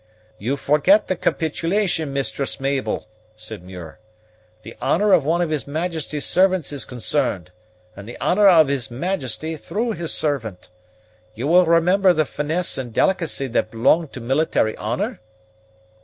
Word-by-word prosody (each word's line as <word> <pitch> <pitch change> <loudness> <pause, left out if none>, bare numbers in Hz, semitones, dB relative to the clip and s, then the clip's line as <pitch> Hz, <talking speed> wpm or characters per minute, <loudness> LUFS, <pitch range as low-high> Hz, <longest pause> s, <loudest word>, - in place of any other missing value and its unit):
"You 130 +7 -2
forget 150 +10 +3
the 185 - +1
capitulation, 165 0 -1
Mistress 140 0 -2
Mabel," 135 -4 -2 0.3
said 110 -2 -8
Muir; 90 -2 -11 0.6
"the 115 - -10
honor 205 +2 +2
of 140 - +4
one 170 +3 +1
of 165 - -3
his 150 -3 -2
Majesty's 155 -1 -3
servants 185 -5 +2
is 140 - -2
concerned, 120 -7 -1 0.4
and 100 +3 -10
the - - -9
honor 200 +3 +3
of 160 -5 +6
his 135 -4 -1
Majesty 155 - -3
through 225 +9 -3
his 170 -6 -3
servant. 115 -13 -2 0.6
You 120 +4 -4
will 175 +3 +4
remember 180 +3 +4
the 155 -2 +1
finesse 160 +3 -1
and 125 -3 -5
delicacy 165 +1 0
that 115 -2 0
belong 130 +9 +2
to 135 - -10
military 125 -3 0
honor?" 195 - -3
150 Hz, 145 wpm, -21 LUFS, 120-175 Hz, 0.6 s, of